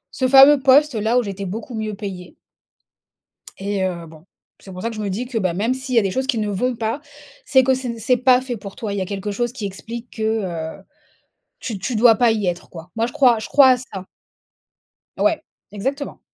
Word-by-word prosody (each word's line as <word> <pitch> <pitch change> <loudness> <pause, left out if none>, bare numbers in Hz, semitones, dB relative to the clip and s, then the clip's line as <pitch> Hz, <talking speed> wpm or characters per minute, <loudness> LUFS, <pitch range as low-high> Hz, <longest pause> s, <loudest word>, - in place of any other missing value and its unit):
ce 260 - +1
fameux 275 +2 +8
poste 280 +2 +5
là 220 +2 +1
où 250 - +3
j'étais 200 -1 -5
beaucoup 225 +8 -6
mieux 215 -2 -4
payée. 190 -3 -8 1.2
Et 195 0 -2
heu, 175 -3 -4
bon, 160 0 -15 0.3
c'est 190 - -12
pour 185 0 -8
ça 230 - -2
que 225 - -8
je - - -5
me 205 -2 -2
dis 225 +7 -3
que, 245 -2 -2
bah, 185 -5 -1
même 220 +7 0
s'il 260 0 -5
y - - +6
a - - +4
des 195 - -1
choses 260 +7 -2
qui 260 -4 0
ne 210 -1 -1
vont 240 +5 -1
pas, 225 +4 -2 0.4
c'est 260 - +4
que 260 +1 +3
c'est 260 -1 -4
ne 230 - -7
c'est 235 +3 +2
pas 250 0 +4
fait 255 -2 -5
pour 200 -2 -10
toi! 215 -3 -4
Il 200 - -3
y - - -1
a - - -4
quelque 200 +1 -4
chose 240 +4 -2
qui 235 -5 -5
explique 230 +5 -8
que, 220 - -4
heu, 190 -6 -3 0.8
tu 220 -5 -5
tu 230 +6 -2
dois 230 +1 +6
pas 240 0 +4
y 215 -3 -2
être 175 -1 -3
quoi. 165 +1 -11
Moi 225 0 +1
je 245 - -8
crois 245 -4 +4
je 220 - -6
crois 280 -2 +6
à 255 - +5
ça. 200 -7 -8 1.1
Ouais. 315 0 +1 0.3
Exactement! 270 +8 -4
225 Hz, 240 wpm, -20 LUFS, 195-255 Hz, 1.2 s, fameux